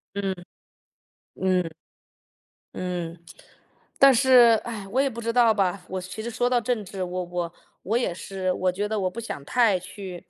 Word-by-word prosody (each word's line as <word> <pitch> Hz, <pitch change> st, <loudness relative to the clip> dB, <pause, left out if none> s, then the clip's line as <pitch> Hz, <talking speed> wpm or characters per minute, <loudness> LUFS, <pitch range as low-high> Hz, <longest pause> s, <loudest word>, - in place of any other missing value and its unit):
嗯。 195 Hz, -1 st, -1 dB, 1.0 s
嗯。 185 Hz, -3 st, +1 dB, 1.0 s
嗯。 175 Hz, -2 st, -4 dB, 0.8 s
但 275 Hz, 0 st, +8 dB
是 245 Hz, -3 st, +6 dB
唉， 225 Hz, -4 st, -5 dB
我 255 Hz, +7 st, 0 dB
也 275 Hz, -, +1 dB
不 235 Hz, -2 st, -7 dB
知 230 Hz, 0 st, -1 dB
道 235 Hz, -2 st, +5 dB
吧， 195 Hz, -2 st, 0 dB
我 185 Hz, 0 st, -3 dB
其 185 Hz, +4 st, -7 dB
实 235 Hz, -, -3 dB
说 245 Hz, +2 st, 0 dB
到 250 Hz, -, +3 dB
政 230 Hz, -2 st, -1 dB
治， 190 Hz, +1 st, -7 dB
我 180 Hz, 0 st, -3 dB
我 175 Hz, -1 st, -4 dB, 0.3 s
我 220 Hz, +5 st, +1 dB
也 240 Hz, -7 st, 0 dB
是， 185 Hz, +1 st, -3 dB
我 185 Hz, 0 st, 0 dB
觉 205 Hz, +3 st, -2 dB
得 215 Hz, -1 st, -1 dB
我 185 Hz, -, 0 dB
不 215 Hz, -, -7 dB
想 180 Hz, -10 st, -6 dB
太 225 Hz, -1 st, +3 dB
去， 185 Hz, 0 st, -9 dB
195 Hz, 185 characters per minute, -25 LUFS, 180-235 Hz, 1.0 s, 但